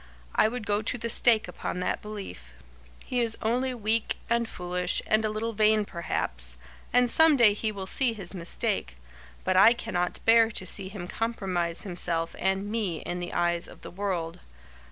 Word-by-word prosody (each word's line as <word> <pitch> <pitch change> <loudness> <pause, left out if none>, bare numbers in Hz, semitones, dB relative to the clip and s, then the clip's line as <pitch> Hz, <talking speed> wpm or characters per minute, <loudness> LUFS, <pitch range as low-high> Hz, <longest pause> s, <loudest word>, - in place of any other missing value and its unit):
I - - +4
would 225 -1 -4
go 205 +1 +1
to 230 +3 -1
the 230 0 -3
stake 225 -3 +4
upon 180 0 -5
that - - -1
belief. 200 - -8 0.5
He 250 - -1
is 230 -2 0
only 250 +3 0
weak 220 0 0
and 235 -1 +1
foolish 180 0 -1
and 215 0 +3
a 215 - +1
little 220 +2 -3
vain, 215 0 +3
perhaps, - - -3 0.3
and 245 0 +4
some 320 +4 +5
day 225 -4 +6
he 215 +1 -2
will 195 -2 -6
see 240 +4 +1
his 195 -5 -8
mistake, 170 - -2 0.5
but 185 - +1
I 200 +5 +8
cannot 180 -7 -2
bear 225 0 +6
to 200 -4 -5
see 190 +1 -1
him 190 -3 -7
compromise 185 -7 -2
himself 170 -3 -2
and 190 +1 0
me 200 -8 -2
in 175 - -4
the 175 - -5
eyes 175 0 +1
of - - -14
the - - -9
world. 180 -3 -3
205 Hz, 180 wpm, -27 LUFS, 175-225 Hz, 0.5 s, I